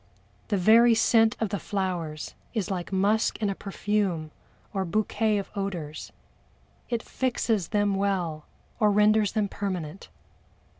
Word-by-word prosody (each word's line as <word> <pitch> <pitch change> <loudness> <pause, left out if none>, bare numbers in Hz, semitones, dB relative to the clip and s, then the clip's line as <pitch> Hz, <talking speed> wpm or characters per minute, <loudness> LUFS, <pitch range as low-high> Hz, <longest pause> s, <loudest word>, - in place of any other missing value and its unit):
The 205 - +1
very 230 +5 +6
scent 225 0 +4
of 220 - 0
the 200 -1 -2
flowers 175 -6 -3 0.2
is 205 -3 -1
like 180 -1 -4
musk 205 +3 +2
in 210 -3 0
a - - -1
perfume 195 -5 -2 0.4
or 195 -2 0
"bouquet" 215 +3 0
of 200 - -4
odors 175 -7 -4 0.8
it 235 -1 -1
fixes 230 -7 -1
them 205 -2 +1
well, 185 -6 -1 0.4
or 210 -2 +4
renders 210 0 +3
them 210 -2 +1
permanent. 185 -4 -5
200 Hz, 135 wpm, -27 LUFS, 185-215 Hz, 0.8 s, very